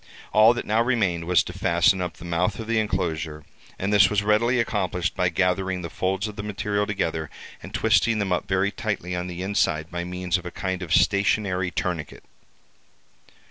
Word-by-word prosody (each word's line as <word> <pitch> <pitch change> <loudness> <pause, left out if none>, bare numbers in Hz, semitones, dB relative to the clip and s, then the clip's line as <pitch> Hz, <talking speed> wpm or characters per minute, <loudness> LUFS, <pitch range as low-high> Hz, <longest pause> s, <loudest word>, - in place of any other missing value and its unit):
All 110 +3 +6
that - - -4
now 110 +2 +2
remained 100 -9 0
was 90 -5 +3
to - - -8
fasten 85 +2 +2
up 90 -1 -4
the - - -11
mouth 90 +4 0
of 110 - -6
the 115 0 +1
enclosure; 80 -7 -2 0.3
and 100 +2 -1
this 100 -1 +6
was 105 -1 +1
readily 115 +4 +2
accomplished 90 -6 -1
by 90 - +1
gathering 90 +1 0
the 85 - -6
folds 95 +3 -1
of 105 0 -9
the - - -3
material 105 0 -2
together, 80 -6 -2 0.3
and - - -10
twisting 115 -1 +2
them 100 -3 -1
up 90 - -2
very 95 +1 +1
tightly 100 -6 -3
on 90 0 -3
the 90 0 -5
inside 85 -5 0
by 85 0 -3
means 90 +1 -2
of 90 - -14
a - - -3
kind 95 +1 -4
of 85 -3 -6
stationary 100 -2 +2
tourniquet. 90 -3 -4
95 Hz, 190 wpm, -24 LUFS, 90-105 Hz, 0.3 s, All